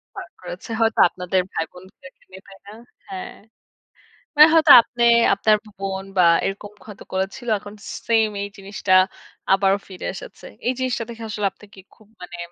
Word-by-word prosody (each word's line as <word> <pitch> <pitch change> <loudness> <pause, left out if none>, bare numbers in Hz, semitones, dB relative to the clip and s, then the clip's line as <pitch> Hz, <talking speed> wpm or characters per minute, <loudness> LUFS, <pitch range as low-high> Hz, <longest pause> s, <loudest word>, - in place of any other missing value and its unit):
পাড় - - -8
করেছে - - -9
হয়তো 225 0 +1
আপনাদের 180 +1 -1
ভাই - - -1
বোনদেরকে 185 0 -16
নিয়ে, 190 +1 -12
তাই 195 - -14
না? 205 - -10 0.4
হ্যাঁ। 190 -1 -7 1.0
মানে 305 +2 +9
হয়তো 315 -2 +6
আপনে, 240 +1 -4 0.3
আপনার 215 +2 +3
ব - - -41
বোন 195 -1 -4
বা, 180 - +5 0.2
এরকম 200 +1 -5 0.2
হয়তো 210 -2 -11
করেছিলো। 195 +6 -3
এখন 205 +1 -12
সে - - -6
সেইম 225 -1 +3 0.2
এই - - -4
জিনিসটা 195 -1 -2 0.6
আবারও 195 0 +2
ফিরে 185 - -9
এসেছে। - - -11 0.2
এই 255 - +2
জিনিসটা 255 -3 -2
দেখে 230 -1 -9
আসলে 210 -1 -3
আপনি 210 - -18
কি 190 - -14 0.2
খুব 215 - -23
মানে 175 -1 -9
200 Hz, 175 wpm, -21 LUFS, 190-225 Hz, 1.0 s, মানে